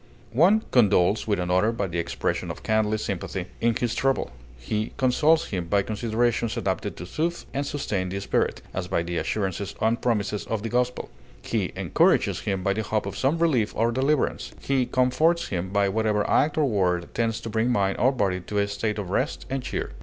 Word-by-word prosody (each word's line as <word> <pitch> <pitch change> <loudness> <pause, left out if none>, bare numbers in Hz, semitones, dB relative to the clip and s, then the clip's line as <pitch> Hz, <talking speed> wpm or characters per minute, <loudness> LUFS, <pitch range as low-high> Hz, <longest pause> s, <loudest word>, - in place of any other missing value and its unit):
One 185 - +5
condoles 105 -4 +3
with 100 -3 +1
another 90 +5 +2
by 115 -3 -2
the 85 -2 -3
expression 85 - -2
of - - -7
kindly 110 0 +1
sympathy 95 -2 -4
in 115 0 +2
his 120 0 -1
trouble; 135 - 0 0.3
he 105 - -3
consoles 150 +5 +3
him 90 -4 -3
by 100 +2 +2
considerations 115 +1 0
adapted 95 -2 -2
to 90 - -6
soothe 170 - -2
and 140 - -1
sustain 105 -11 -2
the 100 +2 -3
spirit, 100 - -1
as 95 -1 -3
by 90 -3 0
the 85 0 -3
assurances 100 0 -2
and 115 +1 +1
promises 105 -3 0
of 110 -2 -2
the 115 - -2
gospel; 125 +1 -1 0.3
he - - -1
encourages - - +2
him 95 -2 -2
by 100 - +2
the 110 - -2
hope 105 +1 -1
of 100 -1 -5
some 140 +5 +1
relief 140 -11 +1
or 115 +1 +2
deliverance; 135 +4 0
he 130 -2 0
comforts 155 +7 +2
him 90 -1 -2
by 100 0 +2
whatever 105 +1 +1
act 150 +1 +2
or 155 - +3
word 90 -7 0
tends 115 -1 0
to 115 - -6
bring 115 +2 +1
mind 100 -5 +1
or 130 - +4
body 100 -8 0
to 105 +4 -5
a 100 0 +2
state 105 +1 -2
of 95 -3 -4
rest 130 +8 -1
and 135 0 -1
cheer. 125 - -4
110 Hz, 200 wpm, -25 LUFS, 95-125 Hz, 0.3 s, One